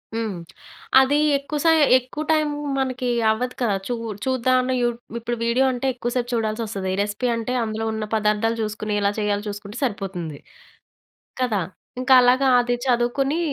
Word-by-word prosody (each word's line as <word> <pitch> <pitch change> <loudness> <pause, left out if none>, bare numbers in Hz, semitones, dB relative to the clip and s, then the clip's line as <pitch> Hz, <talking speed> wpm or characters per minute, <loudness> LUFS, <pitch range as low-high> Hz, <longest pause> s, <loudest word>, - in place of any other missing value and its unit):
హ్మ్. 220 -5 -2 0.6
అదీ 265 +2 +3 0.2
ఎక్కువ 280 +2 -5
సై 325 -1 +5 0.2
ఎక్కువ 255 +4 -5
టైమ్ 310 -1 +2 0.3
మనకి 255 -1 -1 0.2
అవ్వదు 250 +3 -2
కదా! 215 -5 +2
చు 245 - -1 0.3
చూద్దాంలే 255 0 +1
యూ 240 - +2 0.3
ఇప్పుడు 240 +1 -3
వీడియో 235 +3 +2
అంటే 250 +1 -4
ఎక్కువ 240 -1 -4
సేపు 245 -1 -1
చూడాల్సొస్తది. 215 -4 -2
రెసిపీ 205 +5 -2
అంటే 230 +2 -3
అందులో 220 0 -3
ఉన్న 220 -1 -3
పదార్థాలు 215 +1 +1
చూసుకొని, 215 0 -3
ఎలా 200 0 +2
చేయాలో 205 -1 0
చూసుకుంటే 205 +2 -8
సరిపోతుంది. 190 - -3 1.0
కదా! 220 -6 +1 0.4
ఇంకలాగా 255 0 +5
అది 245 0 0
చదువుకొనీ 260 +5 +1
240 Hz, 140 wpm, -22 LUFS, 215-255 Hz, 1.0 s, సై